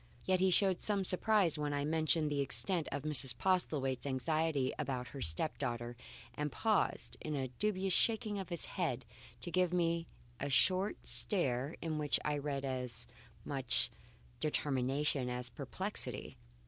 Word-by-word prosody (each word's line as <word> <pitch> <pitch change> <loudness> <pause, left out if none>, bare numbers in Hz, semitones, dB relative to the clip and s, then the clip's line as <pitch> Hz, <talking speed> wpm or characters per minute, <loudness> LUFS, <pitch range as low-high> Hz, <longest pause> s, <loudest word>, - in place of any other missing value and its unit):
Yet 185 -1 +2
he 190 +1 +4
showed 185 0 +3
some 200 -2 +1
surprise 185 -4 +3
when 145 -1 -1
I 145 0 -1
mentioned 155 0 +1
the 145 -1 +1
extent 170 +4 +3
of 145 0 -3
Mrs. 135 -5 +2
Postlethwaite's 145 -8 0
anxiety 140 0 0
about 125 -2 -3
her 135 - -8
step 85 - 0
daughter, 120 0 -3 0.4
and 150 +3 -3
paused, 220 -3 0
in 155 - -4
the 130 -2 -2
dubious 195 -3 +1
shaking 220 -1 +1
of 190 - -6
his 170 -3 -4
head, 130 -1 -2 0.4
to 175 - -5
give 180 -1 +2
me 170 -2 +1 0.3
a 140 - -2
short 185 +8 +2
stare 140 - +1
in 155 -2 -2
which 150 -1 +4
I 150 -1 0
read 140 -1 -3
as 125 -3 -3 0.4
much 130 - +1 0.5
determination 140 -2 0
as 125 -1 -4
perplexity. - - -5
150 Hz, 150 wpm, -35 LUFS, 130-180 Hz, 0.5 s, he